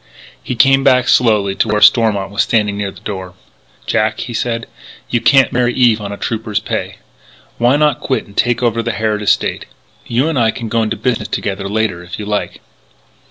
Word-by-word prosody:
He 125 - -4
came 135 +2 +4
back 130 -2 +3
slowly 105 -5 +3
to 105 - 0
where 105 0 +1
Stormont 105 -2 +3
was 100 - +1
standing 105 -3 +1
near 100 -1 -3
the 95 0 -14
door: 95 -4 -6 0.5
"Jack," 110 0 0
he 120 - -6
said, 115 0 -2 0.5
"you 120 - +1
can't 135 -3 +4
marry 125 0 +1
Eve 120 -4 +3
on 100 -1 -5
a 100 - -6
Trooper's 110 -2 -3
pay. - - -4 0.6
Why 120 +3 +3
not 150 -3 +2
quit 130 - -2
and 100 - -18
take 120 0 +1
over 115 -1 +1
the 115 0 -3
Harrod 105 0 -1
estate?... 105 - 0 0.4
You 125 +6 +1
and 160 -5 0
I 115 -1 +3
can 115 0 -5
go 115 +1 +1
into 110 0 -2
business 110 -1 -1
together 100 -2 -3
later 105 -4 -1
if 90 +1 -8
you 105 - -6
like." 105 0 -3
110 Hz, 200 wpm, -16 LUFS, 105-120 Hz, 0.6 s, came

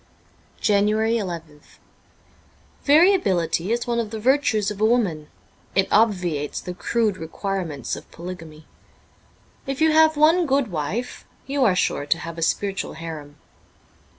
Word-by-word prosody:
^ - - -27
JANUARY^3"th 200 -7 0 1.1
VARIABILITY 225 - +3
is 235 0 0
one 235 -1 -1
of 225 -2 -2
the 220 0 -5
virtues 220 -4 +2
of 210 0 -7
a - - +5
woman. 200 -11 +1 0.5
It 195 0 +3
obviates 180 -9 +1
the 180 - -6
crude 215 +1 0
requirements 165 - -4
of - - -12
polygamy. 165 -3 -9 1.0
If 275 0 -3
you 320 0 +4
have 315 0 +5
one 325 +3 +4
good 275 -5 +1
wife 175 +10 -4 0.2
you 275 0 0
are 195 -5 +3
sure 145 -5 0
to 165 - +2
have 165 0 -7
a - - -5
spiritual 195 +4 -1
harem. 155 -3 -8
200 Hz, 135 wpm, -23 LUFS, 165-240 Hz, 1.1 s, a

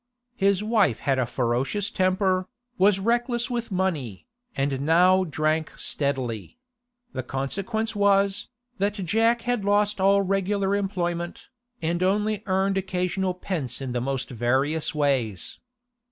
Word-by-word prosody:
His 200 -1 +2
wife 210 - +2
had 135 -2 +1
a 125 - +1
ferocious 130 - -1
temper, 185 0 +1 0.3
was 195 0 +5
reckless 240 +3 0
with 235 -1 -2
money, 165 - -2 0.3
and 135 -1 0
now 180 +5 +5
drank 155 0 -1
steadily; 130 - -2 0.6
the - - -2
consequence 200 - -3
was, 200 -1 +2 0.3
that 200 +1 +1
Jack 225 +5 +2
had 245 -4 0
lost 205 0 +2
all 200 +1 +4
regular 195 +1 0
employment, 175 -4 -3 0.3
and 170 +2 0
only 210 +2 +1
earned 195 +1 +1
occasional 185 0 -1
pence 165 -9 -3
in 135 -2 -4
the 120 0 -1
most 135 0 -3
various 135 +7 0
ways. 130 -10 0
185 Hz, 125 wpm, -25 LUFS, 140-200 Hz, 0.6 s, was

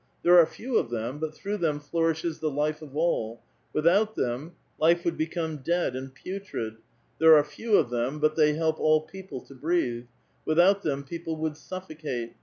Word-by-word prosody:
There 175 0 +8
are 165 - +6
few 240 +7 -2
of - - -3
them, 120 +4 -3
but 155 0 -4
through 205 +1 -3
them 155 -5 0
flourishes 165 +2 -1
the 155 - 0
life 150 +2 -1
of 145 -2 -9
all; 120 -9 0 0.3
without 195 +8 +3
them 130 +8 -2 0.3
life 170 +2 +3
would 170 - +1
become 160 0 -2
dead 170 -1 0
and 130 +1 -6
putrid; 135 - -6 0.4
there 160 0 +8
are 150 - +6
few 205 +10 -1
of 125 -6 +1
them, 120 +4 -1
but 155 0 +2
they 150 -2 +4
help 160 0 0
all 155 0 +4
people 185 -5 -9
to - - -15
breathe; 130 -5 -1 0.4
without 180 +5 +4
them 140 -4 -2
people 165 +2 -5
would 155 -1 -2
suffocate. 155 -9 -6
155 Hz, 185 wpm, -27 LUFS, 140-170 Hz, 0.4 s, There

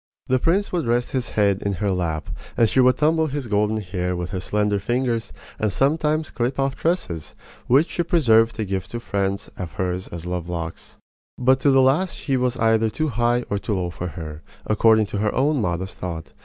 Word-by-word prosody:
The 130 0 +2
prince 185 +8 +1
would 170 -7 -1
rest 120 +1 +1
his 125 -3 -2
head 100 -2 +3
in 100 - -1
her 100 +2 -1
lap, 85 -4 -2 0.3
and 115 - +5
she 130 - +1
would 125 0 +5
tumble 160 +1 +2
his 145 -2 -4
golden 105 0 +1
hair 90 -3 -2
with 90 0 -4
her 95 - -2
slender 105 +2 0
fingers 120 +1 -1 0.3
and 110 -2 +1
sometimes 150 - +1
clip 125 +2 -1
off 135 -1 0
tresses 95 - -2 0.3
which 140 +7 +4
she - - -1
preserved 115 -10 +3
to 110 - -2
give 95 -1 -3
to 120 +4 -5
friends 100 -3 -2
of 90 -3 -6
hers 90 0 -2
as 85 0 -8
love 90 -1 -3
locks. 85 -1 -6 0.4
But 130 +1 +3
to 140 - +3
the 135 -1 +5
last 155 +8 +1
he 135 - 0
was 125 -1 0
either 110 0 +3
too 155 +7 -1
high 120 0 +1
or 100 - 0
too 105 0 -2
low 90 -2 -2
for 90 +1 -5
her, 80 -3 -7 0.2
according 110 0 +4
to 100 0 -4
her 105 0 0
own 140 +1 +2
modest 90 0 -3
thought. 85 -3 -6
110 Hz, 210 wpm, -23 LUFS, 95-130 Hz, 0.4 s, and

